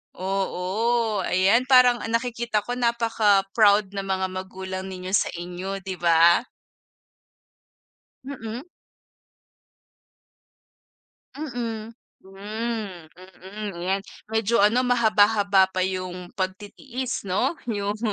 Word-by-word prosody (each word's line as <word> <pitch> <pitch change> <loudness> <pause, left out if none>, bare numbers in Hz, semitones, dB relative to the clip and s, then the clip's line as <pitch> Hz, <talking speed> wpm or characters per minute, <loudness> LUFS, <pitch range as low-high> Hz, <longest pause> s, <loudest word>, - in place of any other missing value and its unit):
Oo. 195 +3 -1
Ayan, 195 +8 +3
parang 255 -2 +5
ang 225 - -4
nakikita 235 -2 0
ko 245 - -2
napaka-proud 210 -4 +2
ng 195 - -2
mga 190 -1 -1
magulang 185 0 -6
ninyo 185 0 -7
sa - - +1
inyo, 180 +3 -5
'di 190 0 -6
ba? 170 +3 +4 1.8
Mm. 240 -4 -6 2.8
Mm. 235 -6 -5 0.3
Hmm. 205 -2 -5
Mm. 190 0 -8
'Yan, 190 +2 0 0.3
medyo 225 0 +1
ano 225 +5 +4
mahaba-haba 210 -5 +4
pa 185 - -1
yung 185 -1 -3
pagtitiis 210 +7 -4
'no, 205 - 0 0.2
yung 205 0 -2
205 Hz, 95 wpm, -24 LUFS, 190-230 Hz, 2.8 s, parang